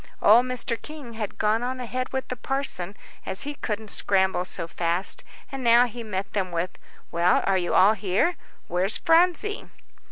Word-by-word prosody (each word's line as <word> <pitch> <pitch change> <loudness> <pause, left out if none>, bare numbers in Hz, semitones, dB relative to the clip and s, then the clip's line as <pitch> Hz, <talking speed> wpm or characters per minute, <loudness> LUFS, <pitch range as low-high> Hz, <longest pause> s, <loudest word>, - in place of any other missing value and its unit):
Old 235 +5 +6
Mr. 250 -2 -3
King 295 -6 -9
had 215 -3 -5
gone 215 +2 +2
on 255 +1 -3
ahead 255 +1 -3
with 265 0 -3
the 255 - -2
parson, 245 -7 -3 0.3
as 190 - -3
he 290 +1 -4
couldn't 215 -6 -4
scramble 190 -2 +2
so 165 - -5
fast. 170 +2 -2 0.3
And 270 -1 -5
now 235 +1 +6
he 240 0 -7
met 200 -2 -4
them 190 -3 -1
with, 170 +1 -3 0.3
"Well, 170 +1 +3
are 195 - +2
you 175 - -1
all 200 +3 +7
here 210 - +1 0.3
where's 185 +4 0
Phronsie?" 360 +5 +2
220 Hz, 170 wpm, -25 LUFS, 190-255 Hz, 0.3 s, all